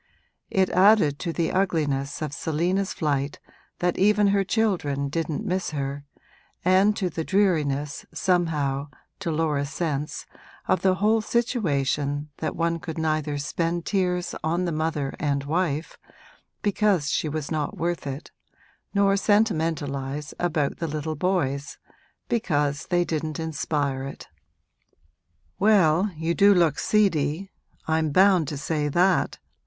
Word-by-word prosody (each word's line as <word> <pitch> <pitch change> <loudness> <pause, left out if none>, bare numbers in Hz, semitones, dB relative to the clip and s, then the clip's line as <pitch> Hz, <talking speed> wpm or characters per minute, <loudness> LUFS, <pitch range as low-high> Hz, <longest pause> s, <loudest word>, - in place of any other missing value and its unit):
It 190 -1 +2
added 185 -6 +5
to 170 - -2
the 165 0 -1
ugliness 150 -7 0
of 150 -2 -4
Selina's 175 +6 -1
flight 145 -2 -1 0.4
that 175 0 0
even 205 +1 +4
her 200 0 +3
children 180 -10 0
didn't 160 0 -2
miss 185 +1 -1
her, 140 -1 -4 0.6
and 190 +3 +4
to 190 - 0
the 165 -1 -3
dreariness, 150 -7 0
somehow, 150 -6 0 0.3
to 195 -3 -3
Laura's 150 -3 0
sense, 150 -1 -3 0.4
of - - +2
the 190 -1 +3
whole 215 +3 +2
situation 150 - 0
that 155 - -3
one 170 0 0
could 160 -1 -6
neither 155 -2 -1
spend 165 +4 -2
tears 180 -3 0
on 170 +3 0
the 170 - -1
mother 155 -3 -1
and 140 -2 0
wife, 155 0 -2 0.6
because 200 -7 +2
she 155 - 0
was 150 0 -4
not 150 -2 -2
worth 170 -3 -2
it, 140 +3 -6 0.6
nor 200 0 +4
sentimentalise 155 -9 0
about 160 -5 0
the 165 - -2
little 155 +1 -3
boys, 145 -5 -1 0.5
because 145 -11 0
they 175 -1 +2
didn't 155 -2 -3
inspire 145 -4 -2
it. 140 - -8 1.3
'Well, 195 -3 +4
you 160 +1 0
do 200 +2 +5
look 165 -5 +3
seedy 185 -3 +1 0.4
I'm 160 -1 +1
bound 185 0 +4
to 145 - -4
say 150 +1 -1
that!' 180 +5 +2
160 Hz, 130 wpm, -25 LUFS, 145-185 Hz, 1.3 s, added